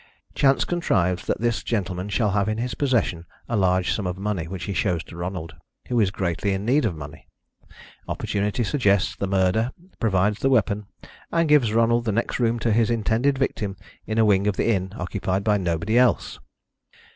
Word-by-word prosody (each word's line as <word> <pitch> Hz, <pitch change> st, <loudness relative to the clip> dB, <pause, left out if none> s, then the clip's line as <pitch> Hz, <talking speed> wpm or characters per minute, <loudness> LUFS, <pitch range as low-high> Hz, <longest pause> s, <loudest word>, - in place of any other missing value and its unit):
Chance 135 Hz, -1 st, +3 dB
contrives 90 Hz, -, 0 dB
that -, -, 0 dB
this 120 Hz, -1 st, 0 dB
gentleman 95 Hz, -3 st, -2 dB
shall 105 Hz, 0 st, +1 dB
have 100 Hz, +1 st, +1 dB
in 110 Hz, -, -1 dB
his 120 Hz, +1 st, -2 dB
possession 115 Hz, -, 0 dB, 0.2 s
a 120 Hz, -, -2 dB
large 95 Hz, -2 st, +2 dB
sum 100 Hz, -4 st, -2 dB
of 90 Hz, 0 st, -3 dB
money 95 Hz, -4 st, -2 dB
which 95 Hz, 0 st, -6 dB
he 100 Hz, -, -3 dB
shows 90 Hz, -4 st, 0 dB
to -, -, -13 dB
Ronald, 85 Hz, -2 st, -5 dB, 0.3 s
who 120 Hz, -1 st, +1 dB
is 105 Hz, -4 st, +3 dB
greatly 95 Hz, +1 st, -1 dB
in 95 Hz, +1 st, -3 dB
need 135 Hz, +4 st, +3 dB
of 95 Hz, -7 st, -1 dB
money. 75 Hz, -1 st, -10 dB, 0.8 s
Opportunity 105 Hz, +4 st, -1 dB
suggests 100 Hz, -, +1 dB
the 100 Hz, -, -3 dB
murder, 95 Hz, +4 st, +2 dB, 0.3 s
provides 105 Hz, -1 st, +1 dB
the 135 Hz, -, +2 dB
weapon, 105 Hz, -5 st, +1 dB, 0.4 s
and 165 Hz, -1 st, +2 dB
gives 145 Hz, -7 st, +4 dB
Ronald 115 Hz, +1 st, +2 dB
the 110 Hz, -, +1 dB
next 115 Hz, +5 st, -1 dB
room 120 Hz, -1 st, +2 dB
to 115 Hz, -, +1 dB
his 115 Hz, +1 st, +3 dB
intended 120 Hz, +4 st, +1 dB
victim 105 Hz, -7 st, -2 dB, 0.3 s
in 110 Hz, -, -2 dB
a 110 Hz, -, +5 dB
wing 100 Hz, -1 st, +3 dB
of 105 Hz, -, 0 dB
the -, -, +1 dB
inn 95 Hz, -3 st, -1 dB
occupied 95 Hz, +1 st, -2 dB
by 105 Hz, -1 st, +3 dB
nobody 90 Hz, +6 st, +1 dB
else. 125 Hz, -1 st, +1 dB
105 Hz, 190 wpm, -24 LUFS, 95-115 Hz, 0.8 s, a